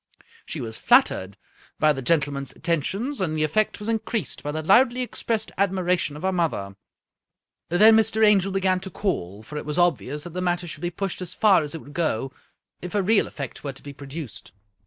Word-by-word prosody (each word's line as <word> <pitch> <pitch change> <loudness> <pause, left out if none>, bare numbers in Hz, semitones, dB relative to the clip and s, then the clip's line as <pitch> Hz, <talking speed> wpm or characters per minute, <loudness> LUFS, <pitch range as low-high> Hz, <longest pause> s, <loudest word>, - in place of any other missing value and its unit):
She - - -5
was 110 -1 -6
flattered 95 +1 +3 0.4
by 155 -1 +4
the 135 - -5
gentleman's 140 -2 0
attentions, 195 - -2
and 155 -4 -1
the 155 - +1
effect 205 +8 0
was 210 - -6
increased 220 - -2
by 145 - -3
the 155 +1 -4
loudly 240 +8 +4
expressed 230 -2 -3
admira 185 -2 +2
tion 145 - -3
of 150 - -10
her 190 - +2
mother. 155 - -1 0.9
Then 215 +6 +7
Mr. 220 0 +3
Angel 195 -2 +4
began 190 -1 +1
to 190 +1 -7
call, 105 - -3
for 150 +7 -8
it - - -8
was 150 - -3
obvious 150 -4 +1
that 175 - -8
the 180 +2 -4
matter 175 -1 0
should 165 - -7
be 175 - -1
pushed 185 +1 -4
as 180 - -5
far 205 -6 +5
as 150 0 -5
if 160 - -7
would 145 - -13
go, 135 -6 -1 0.5
if 180 +3 -6
a 200 - +2
real 210 +2 +3
effect 140 -5 -7
were 140 -2 -4
to 135 - -15
be 145 - -8
produced. 140 - -9
175 Hz, 205 wpm, -24 LUFS, 145-195 Hz, 0.9 s, Then